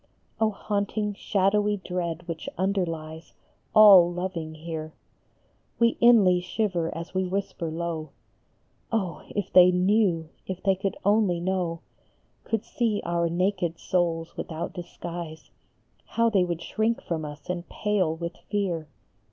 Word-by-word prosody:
Oh, 220 -1 +3
haunting 205 0 -2
shadowy 205 +1 +1
dread 175 -2 -4
which 165 -2 -5
underlies 165 -4 -2 0.4
All 195 -5 +9
loving 175 -3 -4
here! 155 -1 -6 0.8
We 235 0 +3
inly 210 -7 +6
shiver 180 -3 -1
as 170 +2 -7
we 185 0 +1
whisper 190 -3 -3
low, 165 -1 -4 0.4
" - - -41
Oh, 195 -7 -1
if 205 - -4
they 180 0 +9
knew 180 -3 +2 0.2
if 185 -1 -5
they 195 - +4
could 195 +1 -3
only 205 -4 +3
know, 175 -2 -1 0.6
Could 225 -2 -2
see 225 -4 -1
our 170 0 0
naked 180 -1 0
souls 170 -2 -1
without 160 0 -5
disguise 170 -2 -7 0.5
How 230 0 +1
they 195 -4 +4
would 170 -2 -3
shrink 220 +5 0
from 165 -2 -3
us 150 -1 -8
and 180 -1 -4
pale 195 -6 0
with 170 +1 -6
fear 180 -7 -1
180 Hz, 135 wpm, -26 LUFS, 165-200 Hz, 0.8 s, All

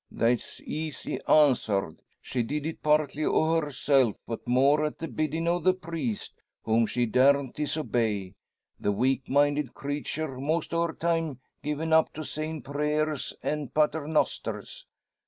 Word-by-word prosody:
"That's 115 0 0
easy 155 -1 -4
answered. 115 - +3 0.2
She 125 - -1
did 145 +6 -2
it 160 - -4
partly 150 0 +2
o' 160 +2 +2
herself; 135 -4 +2
but 115 +1 -6
more 135 +5 +4
at 150 - -2
the 165 - -4
biddin' 155 +2 -2
o' 175 +1 +2
the 185 +2 +3
priest, 165 - -5 0.2
whom 115 0 +2
she 120 +2 0
daren't 135 +3 +3
disobey 115 -10 -1 0.5
the 105 - +1
weak 130 +5 0
minded 145 -1 +2
creature 145 0 -4
most 155 +4 -1
o' 170 0 +2
her 160 - -6
time 165 -5 -1 0.2
given 150 +2 -1
up 160 0 +4
to 155 - -5
sayin' 155 -1 -4
prayers 150 +1 -1
and 150 -3 -3
paternosters. 155 0 0
150 Hz, 140 wpm, -28 LUFS, 130-155 Hz, 0.5 s, more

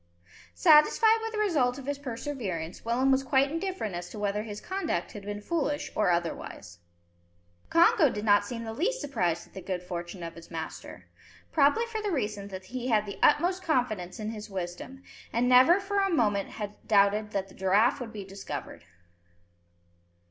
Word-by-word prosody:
Satisfied 440 - +5
with 450 0 -4
the 440 - -5
result 295 -12 +1
of 275 - -9
his 285 0 -3
perseverance, 230 - -5
Willem 250 +4 +2
was 265 0 +3
quite 270 +1 +2
indifferent 335 - -3
as 175 0 -5
to - - -9
whether 205 0 -1
his 210 -1 -7
conduct 385 +1 -3
had 205 - -8
been 205 +1 -5
foolish 290 +2 -2
or 210 - +2
otherwise. 165 - -3 0.9
Congo 340 - +5
did 210 -2 -4
not 205 -1 +5
seem 230 +2 -6
the 225 -1 -5
least 445 - -1
surprised 180 - -1
at - - -24
the 190 - -7
good 180 -1 -4
fortune 175 0 -6
of 165 0 -6
his 170 0 -13
master; 160 -1 -7 0.5
probably 295 +10 +3
for 450 -2 -4
the 420 - -2
reason 210 - -2
that 190 -1 -8
he 250 +5 -5
had 215 -4 +2
the 200 - -7
utmost 360 +5 +3
confidence 225 - -1
in 215 0 -3
his 215 -1 -8
wisdom, 190 +8 -6 0.3
and 240 +2 +1
never 255 +9 +7
for 400 0 -1
a 390 0 +2
moment 210 - +1
had 210 -1 -6
doubted 210 0 +3
that 195 -2 -2
the - - -16
giraffe 205 +8 +2
would 240 -3 -6
be 205 -3 -7
discovered. 195 - -7
225 Hz, 180 wpm, -28 LUFS, 195-290 Hz, 0.9 s, never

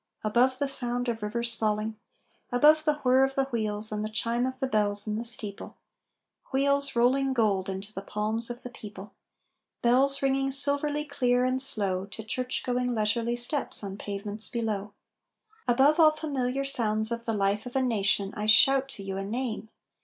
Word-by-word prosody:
Above 245 +4 +2
the 280 - -1
sound 245 -2 -2
of 230 -2 -3
rivers 235 +3 -2
falling, 215 0 -2 0.6
Above 300 +5 +4
the 300 -1 +2
whir 260 +1 +4
of 270 0 -1
the 270 - +2
wheels 215 -2 -1
and 210 0 -3
the 215 - -4
chime 230 +3 -1
of 260 0 -6
bells 205 -1 +2
in 210 -1 -3
the 225 - -3
steeple 220 -4 -5 0.7
Wheels, 280 0 +1
rolling 265 +3 +2
gold 200 -6 0
into 195 +2 -7
the 195 - -6
palms 215 +3 -2
of 240 0 -6
the 250 - -8
people 205 -3 -11 0.7
Bells 270 +3 +3
ringing 270 0 +1
silverly 285 +2 +4
clear 250 -3 0
and 255 +1 0
slow 195 -7 0
To 220 +2 -8
church 250 +4 -3
going, 250 -1 -1
leisurely 225 +2 0
steps 240 0 -1
on 195 -1 -6
pavements 205 +1 -2
below. 210 -4 -3 0.7
Above 270 +6 +3
all 315 -1 +7
familiar 275 -4 -3
sounds 220 -4 +2
of 235 0 -4
the 225 - -1
life 205 +2 -1
of 245 - -10
a 265 - +2
nation 200 -4 0
I 210 0 -4
shout 270 +5 +5
to 200 - -9
you 195 0 -5
a 195 - -3
name. 220 +1 -4
235 Hz, 175 wpm, -27 LUFS, 210-265 Hz, 0.7 s, all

